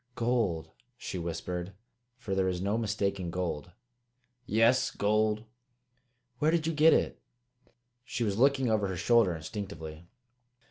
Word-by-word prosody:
"Gold!" 115 -9 0 0.3
she 95 - -5
whispered, 85 +2 -4 0.4
for 115 -5 -4
there 95 -1 +2
is 90 -1 -1
no 100 +3 0
mistaking 100 -5 -1
gold. 90 -2 -3 0.8
"Yes, 115 +4 +4
gold!" 110 +1 +1 1.0
"Where 150 - +3
did 165 -1 +1
you 165 - 0
get 155 +1 +6
it?" - - 0 0.8
She 120 -1 -3
was 105 -1 -1
looking 135 0 +4
over 110 -3 +2
her 95 -1 -4
shoulder 105 -2 +3
instinctively. 80 -1 -7
105 Hz, 130 wpm, -30 LUFS, 90-120 Hz, 1.0 s, get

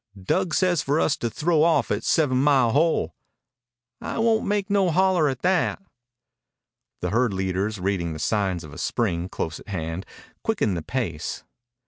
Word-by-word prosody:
"Dug 170 - 0
says 180 -4 +2
for 145 +3 0
us 145 - +2
to 120 - -2
throw 155 +6 +1
off 165 0 +3
at - - -1
Seven 130 -6 +2
Mile 135 -5 +4
Hole." 160 +5 +2 0.9
"I - - -4
won't 225 -1 +2
make 205 -1 0
no 200 -3 +2
holler 180 -2 +3
at 130 -2 -5
that." 180 +1 +1 1.2
The 90 - -2
herd 115 -1 +2
leaders, 95 +2 -1
reading 90 -3 -1
the - - -6
signs 95 -1 -1
of 75 -2 -11
a - - -9
spring 90 -6 -1
close 80 -4 -4
at - - -15
hand, 85 -1 -4 0.4
quickened 110 - 0
the 85 - -3
pace. 110 - -4
125 Hz, 165 wpm, -24 LUFS, -, 1.2 s, Mile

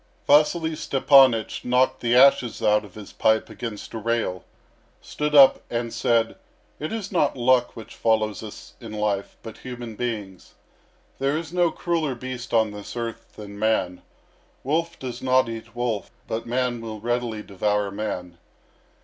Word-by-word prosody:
Vasily 155 +3 +4
Stepanych 135 -5 +4
knocked 125 +1 +2
the 120 0 +2
ashes 130 -2 +4
out 105 0 +3
of 100 -3 -14
his 105 -2 -10
pipe 110 0 +1
against 115 -4 -7
a 115 - -4
rail, 110 -5 -1 0.6
stood 150 0 -3
up, 140 -2 +8
and 115 0 -3
said: 115 -1 +1 0.4
"It 155 - -4
is 215 -3 -4
not 150 -7 +1
luck 125 0 +2
which 115 - -10
follows 110 -2 0
us 110 -1 -10
in 115 -2 -8
life, 105 -2 -2
but 110 -1 -9
human 120 -3 -7
beings. 105 -6 -5 0.6
There 140 +3 +1
is 165 0 -6
no 175 -1 +3
crueller 160 -6 -2
beast 125 0 -7
on 110 -2 +2
this 105 +2 -9
earth 115 -1 -6
than 100 -1 -10
man. 100 -5 0 0.6
Wolf 165 +5 -1
does 125 -2 -6
not 130 -1 +3
eat 115 +1 -8
wolf, 120 -4 -2 0.2
but 115 +1 -4
man 125 -1 -1
will 110 -1 -6
readily 120 -1 -2
devour 105 +1 -1
man." 90 -4 -5
115 Hz, 155 wpm, -24 LUFS, 110-130 Hz, 0.6 s, up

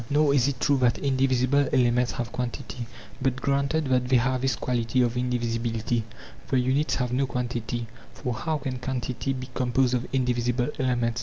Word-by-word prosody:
Nor 145 0 +3
is 135 -2 +4
it 135 -3 -2
true 145 -2 +3
that 120 -2 +3
indivisible 135 0 +2
elements 125 0 +3
have 120 -1 -4
quantity; 125 -1 -4 0.3
but, 130 -1 +1
granted 140 +3 +1
that 125 -2 +1
they 130 - +4
have 125 +1 +2
this 130 -3 +1
quality 120 0 0
of 120 0 0
indivisibility, 115 -2 -1 0.4
the 130 - +1
units 130 +5 +1
have 125 -1 -1
no 135 +1 +1
quantity; 120 -2 -3 0.3
for 125 - -4
how 155 +7 -1
can 135 -3 -4
quantity 130 +1 -2
be 130 -1 -5
composed 125 0 +1
of 125 -1 -1
indivisible 125 -1 +1
elements? 120 -3 0
125 Hz, 170 wpm, -26 LUFS, 120-135 Hz, 0.4 s, is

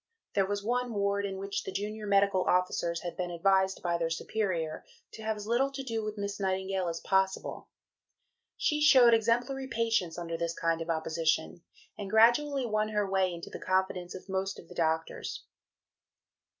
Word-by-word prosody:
There 195 -1 +2
was 205 0 -2
one 245 +1 -1
ward 200 0 0
in 190 -1 -5
which 195 +1 -3
the - - -6
junior 210 +2 -4
medical 200 -2 +3
officers 175 -2 +1
had 175 - -5
been 180 -1 -3
advised 190 +2 +2
by 170 -1 0
their 165 -1 0
superior 165 -2 -2 0.3
to 220 - -10
have 220 0 -2
as 205 - -7
little 240 +5 +2
to 270 0 -4
do 225 -4 -3
with 215 0 -4
Miss 200 0 -4
Nightingale 190 -1 -1
as 165 0 -3
possible. 190 0 0 0.9
She 300 0 +1
showed 260 -6 +7
exemplary 245 +4 +1
patience 225 -9 0
under 165 -1 -4
this 170 0 -2
kind 165 0 0
of 165 - -5
opposition, 160 +1 0 0.4
and 200 -2 -5
gradually 245 +5 +4
won 215 -1 0
her 210 -2 0
way 190 -1 +1
into 170 -1 -8
the - - -7
confidence 185 -1 -1
of 185 - -10
most 190 0 -2
of 170 - -13
the - - -10
doctors. 160 -1 -2
195 Hz, 175 wpm, -30 LUFS, 175-220 Hz, 0.9 s, showed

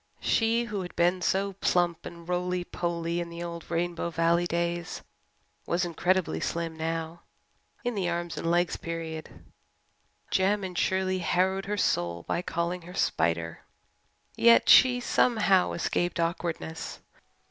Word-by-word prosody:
She, 230 +1 +2
who 210 -4 -4
had 175 - -8
been 175 +2 +2
so 195 +2 0
plump 175 -3 0
and 170 -1 -11
roly 180 0 -1
poly 170 -1 -2
in 170 -1 -4
the 170 0 -6
old 170 -1 -7
Rainbow 170 0 -1
Valley 170 +1 +2
days, 170 0 -2 0.6
was 175 +1 +1
incredibly 180 +2 0
slim 165 -1 -3
now, 165 +1 -3 0.6
in 245 -1 -1
the 190 -4 -1
arms 170 -1 -3
and 165 - -2
legs 175 0 +2
period. 165 -1 -6 0.9
Jem 200 +2 +2
and 185 -1 -5
Shirley 185 +1 +1
harrowed 190 +2 +1
her 210 0 -1
soul 85 - 0
by - - -1
calling 170 +1 -2
her 180 +2 -11
"Spider." 85 - 0 0.8
Yet 235 0 +6
she 250 -1 +7
somehow 210 -7 +3
escaped 175 +1 -1
awkwardness. 165 -1 -3
175 Hz, 135 wpm, -28 LUFS, 170-185 Hz, 0.9 s, she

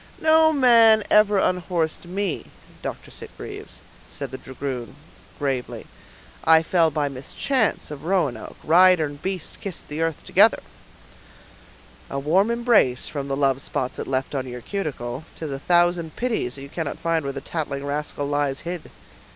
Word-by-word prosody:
"No 315 0 +5
man 230 -6 +6
ever 210 -1 +5
unhorsed 175 -3 0
me, 190 -1 -3 0.3
Dr. - - -6
Sitgreaves," - - -9 0.3
said - - -7
the 130 - -5
dragoon, 130 -2 -6 0.4
gravely. 135 -4 -3 0.6
"I 160 0 +6
fell 165 -1 +3
by 150 -1 -1
mischance 150 - -1
of 145 -1 -8
Roanoke; 175 -8 -1
rider 180 0 +6
and 145 -1 -8
beast 185 -3 -4
kissed 195 -5 -6
the 150 +2 -4
earth 165 -2 -2
together." - - +4 1.5
"A 140 - -4
warm 170 +10 +2
embrace, 235 - +2
from 140 -2 -5
the 135 0 -2
love 135 -1 +2
spots 130 -2 -3
it - - -4
left 130 +1 -2
on 130 -2 -2
your 125 -1 -7
cuticle; 135 - -4
'tis 155 -3 -6
a 135 - -4
thousand 175 0 +2
pities 225 - -1
that 135 - -9
you 140 - -10
cannot 160 -1 -4
find 165 -2 0
where 140 - -2
the 135 - -5
tattling 140 -1 -4
rascal 145 0 -3
lies 145 -1 -1
hid." 175 0 -6
160 Hz, 155 wpm, -23 LUFS, 140-185 Hz, 1.5 s, man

